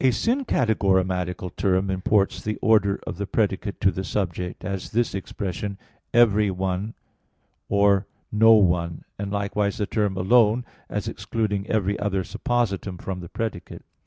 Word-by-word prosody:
2). 130 - +4
A - - +5
syncategorematical 95 - 0
term 95 0 +1
imports 95 +2 +1
the 110 0 -2
order 105 -4 +3
of - - -5
the 100 - -2
predicate 100 -1 -1
to 95 - +3
the 95 - -4
subject; 90 -2 -3
as 100 -2 -4
this 120 +1 +1
expression 100 0 -4 0.3
"every 105 -3 +4
one" 95 +3 -2 0.7
or 100 -1 +3 0.2
"no 115 +1 +6
one"; 85 -5 +2 0.2
and 100 -1 -3
likewise 100 0 -1
the 105 - 0
term 105 -3 -1
"alone," 115 +4 +4 0.2
as - - -3
excluding 105 -3 -2
every 100 -2 0
other 95 -2 0
suppositum 100 -2 -2
from 95 -1 -5
the 85 -2 -9
predicate. 115 -1 -5
100 Hz, 145 wpm, -24 LUFS, 95-110 Hz, 0.7 s, no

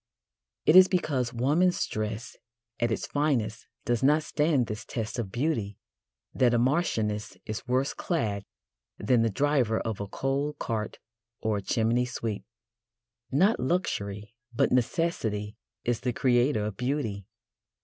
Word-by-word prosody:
It 155 - +5
is 185 0 +10
because 140 -10 0
woman's 150 +10 +2
dress 110 +2 -4 0.4
at 120 0 +1
its 115 - -1
finest 125 -7 -1 0.2
does 120 -1 +1
not 150 +4 +4
stand 150 -4 +2
this 105 0 -5
test 115 0 -4
of 105 -5 -3
beauty 120 -6 -1 0.6
that 120 -2 +3
a - - +4
marchioness 115 -6 0
is 110 +5 -5
worse 130 +3 +1
clad 105 - -1 0.5
than 115 +3 +2
the 115 - +3
driver 130 -1 +1
of 110 -3 -3
a 100 - -4
coal 135 +6 -1
cart 110 -6 -3 0.4
or 110 -1 0
a - - -3
chimney 115 +4 +1
sweep. 115 -4 -4 0.9
Not 190 - +3
luxury, 105 - -2 0.2
but 120 - +1
necessity, 115 -6 0 0.3
is 120 -1 +1
the 125 0 -1
creator 120 -2 +2
of 105 -3 -4
beauty. 125 -7 -2
120 Hz, 140 wpm, -28 LUFS, 110-145 Hz, 0.9 s, is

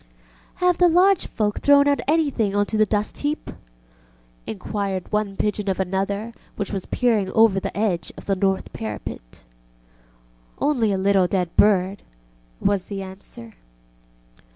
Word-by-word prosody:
ŌĆ£Have 360 -1 +3
the 355 - +5
lodge 365 +2 +4
folk 210 -1 -1
thrown 285 0 +5
out 285 0 +2
anything 280 -10 +1
on 205 0 +2
to 220 - -4
the 215 0 +3
dust 210 +1 -2
heap? 295 +1 -2
ŌĆØ - - -8 0.9
inquired 190 - -4
one 210 -2 -1
pigeon 210 -1 -1
of 190 - -1
another 195 +4 -2 0.2
which 205 0 -4
was 195 -2 -4
peering 225 -6 +1
over 220 -4 +4
the - - -5
edge 185 -7 -1
of - - -11
the 195 - +1
north 190 0 -1
parapet. 105 - -7 1.2
ŌĆ£Only 250 -8 +1
a 195 - 0
little 190 -1 +3
dead 180 -2 -2
bird, 195 -1 +3 0.6
ŌĆØ - - -11
was 200 -2 +2
the 195 -1 -5
answer. 190 - -11
205 Hz, 155 wpm, -22 LUFS, 190-225 Hz, 1.2 s, the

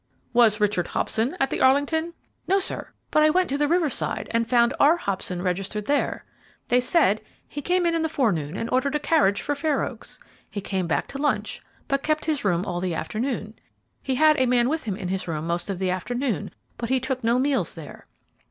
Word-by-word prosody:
"Was 230 -3 +5
Richard 205 -4 +1
Hobson 245 +11 -1
at 270 - +1
the - - -2
Arlington?" 305 +6 +2 0.3
"No, 390 - +4
sir; 390 - -3 0.2
but 305 - +4
I 310 - +6
went 365 +3 +2
to 280 - 0
the 295 - +3
Riverside, 325 -4 0
and 230 0 0
found 240 0 +4
R. 310 +4 +6
Hobson 185 - -3
registered 195 +3 -2
there. 285 +3 0 0.4
They 245 +1 +4
said 245 - +3 0.3
he 290 - -6
came 355 +4 +1
in 340 - +2
in 330 - +1
the 320 - 0
forenoon 190 - 0
and 230 - -2
ordered 270 +3 +1
a - - +2
carriage 295 -10 +2
for 290 - 0
Fair 295 0 0
Oaks. - - -7 0.3
He 205 - -5
came 190 -2 -2
back 165 - 0
to 275 - -6
lunch, 290 0 -1 0.3
but 275 0 0
kept 310 +1 0
his 305 -3 -1
room 180 -2 +1
all 175 -1 -3
the 180 -2 -2
afternoon. 215 - -3 0.5
He 265 - -1
had 305 +2 +5
a 260 - +3
man 245 0 +3
with 315 -2 -2
him 205 -4 -2
in 185 -2 -5
his 190 0 -2
room 155 -2 -3
most 170 +3 -2
of 195 - -2
the 185 0 0
afternoon, 240 +6 -2 0.3
but 235 - -3
he 260 0 +3
took 260 0 -3
no 235 +2 +3
meals 270 +1 0
there. - - -11
250 Hz, 215 wpm, -24 LUFS, 200-295 Hz, 0.5 s, I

